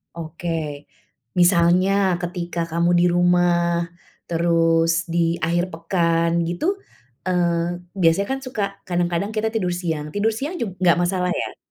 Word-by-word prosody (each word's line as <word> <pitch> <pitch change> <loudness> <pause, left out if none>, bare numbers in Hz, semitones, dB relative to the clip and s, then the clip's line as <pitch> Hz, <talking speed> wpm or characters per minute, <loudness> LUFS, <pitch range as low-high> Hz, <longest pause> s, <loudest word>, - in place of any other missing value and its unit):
Oke, 160 -3 -5 0.5
misalnya 175 +1 +4 0.3
ketika 175 -1 -4
kamu 170 +1 +1
di 175 - +3
rumah, 175 -1 +2 0.4
terus 165 -1 +2 0.2
di 170 - 0 0.3
akhir 175 +2 +1
pekan 165 0 +1 0.2
gitu, 175 - -3 0.6
eee, 175 -1 0 0.2
biasanya 165 +4 +3
kan 270 - -1
suka 250 -4 -4 0.3
kadang-kadang 175 +3 -1
kita 220 +1 0
tidur 180 -5 0
siang, 160 -4 -2
tidur 215 +2 +2
siang 295 +8 -4
jug 220 -5 -2
nggak 175 -2 +4
masalah 180 0 0
ya? - - -5
175 Hz, 130 wpm, -22 LUFS, 170-180 Hz, 0.6 s, misalnya